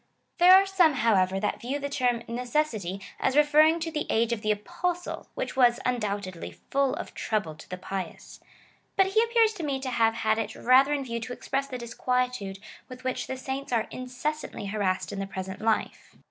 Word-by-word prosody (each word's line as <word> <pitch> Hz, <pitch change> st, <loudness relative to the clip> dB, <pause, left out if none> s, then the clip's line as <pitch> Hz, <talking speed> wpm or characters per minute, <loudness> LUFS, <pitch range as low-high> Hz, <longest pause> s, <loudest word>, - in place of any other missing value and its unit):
There 360 Hz, +2 st, +9 dB
are 385 Hz, +1 st, +6 dB
some, 365 Hz, -5 st, +4 dB
however, 195 Hz, -7 st, +2 dB
that 210 Hz, -, -2 dB
view 260 Hz, +4 st, -2 dB
the 285 Hz, 0 st, -3 dB
term 250 Hz, -4 st, 0 dB
necessity 235 Hz, -, -2 dB, 0.2 s
as 265 Hz, -, +1 dB
referring 305 Hz, +2 st, +5 dB
to 325 Hz, 0 st, -2 dB
the 300 Hz, -1 st, -3 dB
age 230 Hz, +1 st, +2 dB
of 220 Hz, -, -3 dB
the 215 Hz, -, -2 dB
Apostle, 345 Hz, -, -2 dB
which -, -, -4 dB
was, 245 Hz, -2 st, +4 dB
undoubtedly, 200 Hz, -7 st, -2 dB, 0.2 s
full 275 Hz, -1 st, +2 dB
of -, -, -7 dB
trouble 210 Hz, -8 st, -2 dB
to 150 Hz, -, -14 dB
the 185 Hz, -, -5 dB, 0.2 s
i:>ious: 190 Hz, -1 st, -6 dB, 0.6 s
but 385 Hz, -, +5 dB
he 435 Hz, +3 st, +3 dB
appears 460 Hz, -2 st, +3 dB
to 365 Hz, -6 st, -7 dB
me 280 Hz, -3 st, -1 dB
to 265 Hz, -1 st, -4 dB
have 225 Hz, -1 st, +2 dB
had 220 Hz, -1 st, +1 dB
it 220 Hz, 0 st, -3 dB
rather 260 Hz, +3 st, +5 dB
in 285 Hz, -2 st, -1 dB
view 235 Hz, -2 st, -3 dB
to 230 Hz, +2 st, -6 dB
express 275 Hz, +2 st, -2 dB
the 260 Hz, -2 st, -5 dB
disquietude 245 Hz, -3 st, -2 dB, 0.3 s
with 255 Hz, 0 st, -10 dB
which 255 Hz, 0 st, -2 dB
the 260 Hz, -, -4 dB
saints 265 Hz, +1 st, -5 dB
are 230 Hz, -3 st, +1 dB
inces 255 Hz, +4 st, -3 dB
santly 205 Hz, -, -7 dB
harassed 200 Hz, -3 st, -1 dB
in 200 Hz, -, -4 dB
the 195 Hz, -, -3 dB
present 190 Hz, +1 st, -6 dB
life. 220 Hz, 0 st, -1 dB
250 Hz, 200 wpm, -27 LUFS, 215-285 Hz, 0.6 s, There